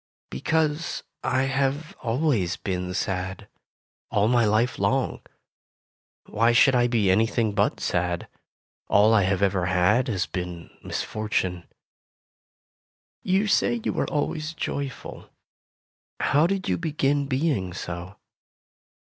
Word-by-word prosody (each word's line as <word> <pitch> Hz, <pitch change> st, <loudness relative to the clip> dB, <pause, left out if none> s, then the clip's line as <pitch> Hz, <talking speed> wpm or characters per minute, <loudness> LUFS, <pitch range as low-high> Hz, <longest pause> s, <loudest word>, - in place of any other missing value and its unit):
"Because 155 Hz, -, -1 dB, 0.2 s
I 130 Hz, +1 st, +1 dB
have 135 Hz, +3 st, -1 dB
always 120 Hz, -, 0 dB
been 90 Hz, -1 st, -3 dB
sad, 95 Hz, 0 st, -3 dB, 0.6 s
all 105 Hz, 0 st, +2 dB
my 120 Hz, -1 st, +3 dB
life 110 Hz, +3 st, +1 dB
long. -, -, 0 dB, 1.0 s
Why 115 Hz, +2 st, +2 dB
should 135 Hz, +3 st, +5 dB
I 120 Hz, -1 st, +3 dB
be 110 Hz, -6 st, +2 dB
anything 110 Hz, +2 st, +2 dB
but 100 Hz, +1 st, +1 dB
sad? 90 Hz, -1 st, -1 dB, 0.6 s
All 105 Hz, +2 st, +5 dB
I 110 Hz, -, +5 dB
have 95 Hz, +1 st, +1 dB
ever 95 Hz, -3 st, +1 dB
had 90 Hz, +7 st, +3 dB
has 100 Hz, -6 st, -1 dB
been 90 Hz, -2 st, -6 dB
mis -, -, -3 dB
fortune. 95 Hz, -5 st, -2 dB, 1.6 s
You 190 Hz, +3 st, +1 dB
say 235 Hz, +3 st, +2 dB
you -, -, -1 dB
are -, -, 0 dB
always 155 Hz, +1 st, -2 dB
joyful? 140 Hz, -3 st, -5 dB, 0.9 s
How 150 Hz, +4 st, +3 dB
did 195 Hz, 0 st, -2 dB
you -, -, 0 dB
begin 145 Hz, -3 st, 0 dB
being 130 Hz, -, 0 dB
so 85 Hz, +1 st, -6 dB
115 Hz, 120 wpm, -25 LUFS, 95-140 Hz, 1.6 s, should